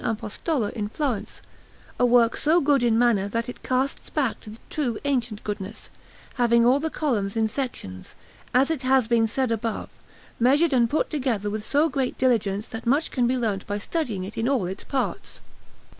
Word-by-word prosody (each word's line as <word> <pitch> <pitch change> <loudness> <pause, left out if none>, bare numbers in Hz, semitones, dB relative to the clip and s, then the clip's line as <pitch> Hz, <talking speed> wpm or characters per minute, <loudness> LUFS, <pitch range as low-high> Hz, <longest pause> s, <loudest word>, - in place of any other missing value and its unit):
Apostolo 225 +3 -1
in 210 -2 -3
Florence, 255 -4 -3 0.6
a 245 - +5
work 235 -1 +4
so 320 +3 +3
good 285 -3 +3
in 235 -2 +3
manner 230 -5 +3
that 230 +3 -2
it 245 - -8
casts 260 +2 -1
back 275 -7 -1
to - - -11
the 215 - -8
true 250 -8 -1
ancient 240 -6 -1
goodness, 205 -2 -6 0.5
having 235 -1 +4
all 255 +3 +5
the 320 +2 -2
columns 225 -11 -1
in 220 0 +2
sections, 210 - -5 0.4
as 270 +5 +3
it 310 -5 -2
has 260 -2 +3
been 230 -1 +3
said 255 +2 -1
above, 225 0 -2 0.5
measured 280 +6 +4
and 235 -3 +3
put 310 - 0
together 240 -9 -1
with 215 0 -3
so 295 +7 +2
great 270 -5 -2
diligence 215 -5 +1
that 225 +1 -7
much 285 +6 +2
can 245 -3 +1
be 255 +1 +1
learnt 210 -5 -2
by 205 0 -2
studying 220 - -3
it 195 +4 -6
in 230 +3 +1
all 265 -9 +1
its 185 +2 -5
parts. 270 -2 -3
240 Hz, 190 wpm, -25 LUFS, 215-270 Hz, 0.6 s, a